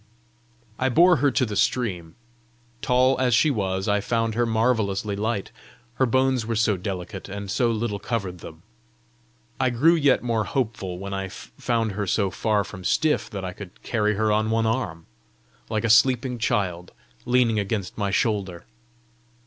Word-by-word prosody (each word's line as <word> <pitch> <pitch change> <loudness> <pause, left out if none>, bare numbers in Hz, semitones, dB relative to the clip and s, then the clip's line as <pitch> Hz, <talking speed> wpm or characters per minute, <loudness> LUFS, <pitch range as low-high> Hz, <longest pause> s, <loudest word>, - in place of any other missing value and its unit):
I 130 - +2
bore 175 +6 +5
her 145 - +3
to 130 0 +1
the 105 -3 -5
stream. 95 -6 -1 0.7
Tall 130 +1 +3
as 125 -2 +3
she 150 +7 +4
was, 95 -4 -2
I 105 -1 +2
found 115 +1 -1
her 120 +1 +1
marvellously 110 -3 0
light, 105 0 -2 0.5
her 130 - +3
bones 130 0 +2
were 115 +1 -3
so 110 -1 +2
delicate, 95 +1 -6
and 100 0 -6
so 120 +4 +2
little 110 -2 -2
covered 100 -6 -3
them. 80 0 -11 1.0
I 130 - +2
grew 135 +8 +4
yet 145 -7 +3
more 115 -3 0
hopeful 110 -8 -3
when 100 +1 -6
I 95 0 -3
found 115 +3 -3
her 100 0 -3
so 100 +1 +1
far 105 +1 0
from 95 -2 -10
stiff 155 - +1
that 100 -4 -5
I 90 - -5
could 95 -1 -11
carry 105 -2 0
her 110 +1 +1
on 110 +1 +1
one 115 0 +1
arm, 105 -9 -2 0.6
like 110 -1 -1
a 115 - 0
sleeping 125 +1 +3
child, 90 -5 -1 0.3
leaning 120 -3 +3
against 100 -2 -3
my 100 -2 -1
shoulder. 100 -5 -1
110 Hz, 165 wpm, -24 LUFS, 100-120 Hz, 1.0 s, bore